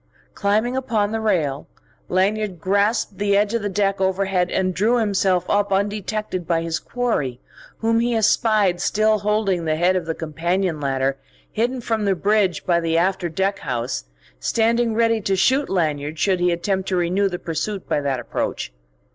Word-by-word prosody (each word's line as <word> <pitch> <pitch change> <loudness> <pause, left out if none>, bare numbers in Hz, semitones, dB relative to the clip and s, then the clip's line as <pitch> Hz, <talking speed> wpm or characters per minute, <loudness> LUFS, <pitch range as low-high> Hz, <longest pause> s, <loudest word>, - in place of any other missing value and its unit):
Climbing 215 +5 +1
upon 220 -6 0
the 225 - -1
rail, 155 -10 0 0.4
Lanyard 195 0 0
grasped 205 +3 0
the 200 -1 +2
edge 205 +1 +1
of 230 - 0
the 205 - -2
deck 195 0 0
overhead 190 -1 +1
and 185 -1 0
drew 220 +7 +2
himself 195 -5 +1
up 205 -1 +1
undetected 205 -2 -2
by 165 -1 +1
his 165 -1 -2
quarry, 185 - -2 0.4
whom 230 0 +2
he 235 0 +1
espied 215 -4 +2
still 215 0 +2
holding 200 -4 0
the 155 -1 +1
head 175 +3 +2
of 175 -3 -2
the 165 - -2
companion 170 +2 -1
ladder, 135 -1 0 0.3
hidden 245 +3 -1
from 225 -2 -1
the 195 -1 +2
bridge 195 -2 +1
by 170 -1 +3
the 165 -1 0
after 180 0 +1
deck 190 +5 -1
house, 120 - -3 0.3
standing 230 - +1
ready 230 -1 +2
to 195 -1 0
shoot 260 +9 +2
Lanyard 155 -4 -1
should 185 +3 +1
he 180 0 +2
attempt 190 +2 -1
to 190 - 0
renew 180 +3 +1
the 180 - -4
pursuit 185 +4 -4
by 145 - 0
that 135 -3 -1
approach. - - -3
195 Hz, 170 wpm, -22 LUFS, 170-215 Hz, 0.4 s, by